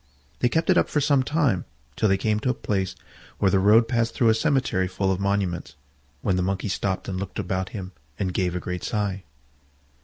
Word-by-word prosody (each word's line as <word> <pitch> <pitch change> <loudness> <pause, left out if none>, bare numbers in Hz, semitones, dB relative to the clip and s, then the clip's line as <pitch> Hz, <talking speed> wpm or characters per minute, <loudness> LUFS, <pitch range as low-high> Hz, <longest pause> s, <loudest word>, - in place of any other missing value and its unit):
They 125 - +3
kept 160 +7 +2
it 180 - +5
up - - 0
for 150 - +1
some 140 -1 +3
time, 130 - +1 0.3
till 110 - +2
they 95 - +3
came 105 +1 0
to 125 - -1
a 125 - +1
place 95 -2 -2 0.4
where 95 - +2
the 95 - +4
road 110 +4 +5
passed 115 -1 0
through 115 - +4
a - - +6
cemetery 120 - +1
full 95 +1 -1
of 95 - -1
monuments, 100 -4 -1 0.5
when 95 -3 +1
the - - +1
Monkey 95 +3 -1
stopped 95 -1 -2
and 95 -1 -3
looked 95 -1 -6
about 95 0 -2
him 95 -3 -6 0.3
and 95 -2 -2
gave 90 -1 0
a - - -1
great 90 0 -5
sigh. 100 -3 -1
100 Hz, 215 wpm, -25 LUFS, 95-115 Hz, 0.5 s, a